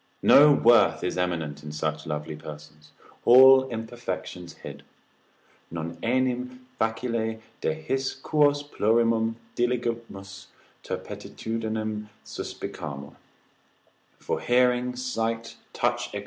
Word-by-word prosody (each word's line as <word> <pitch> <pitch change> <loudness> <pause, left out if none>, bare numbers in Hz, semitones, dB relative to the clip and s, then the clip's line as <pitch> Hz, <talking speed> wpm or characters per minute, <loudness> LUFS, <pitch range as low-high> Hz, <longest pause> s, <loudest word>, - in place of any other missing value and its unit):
No 150 +1 +8
worth 115 - +5
is 90 - -1
eminent 85 -5 -2
in 75 0 -8
such 75 +1 -3
lovely 75 0 -4
persons, 75 0 -11 0.3
all 130 +2 +8
imperfections 110 -6 -6
hid; - - -10 0.9
non 85 0 -6
enim 125 +1 -1
facile 110 0 -1 0.2
de - - 0
his 135 -4 -2
quos 145 +1 +2
plurimum 115 -3 +1 0.2
diligimus, 115 -5 -3 0.4
turpitudinem 110 -1 -4 0.2
suspicamur, 70 -2 -7 1.0
for - - -3
hearing, 125 0 +2
sight, 115 -2 -3
touch, - - -1
&c. - - -5
115 Hz, 95 wpm, -26 LUFS, 90-125 Hz, 1.0 s, No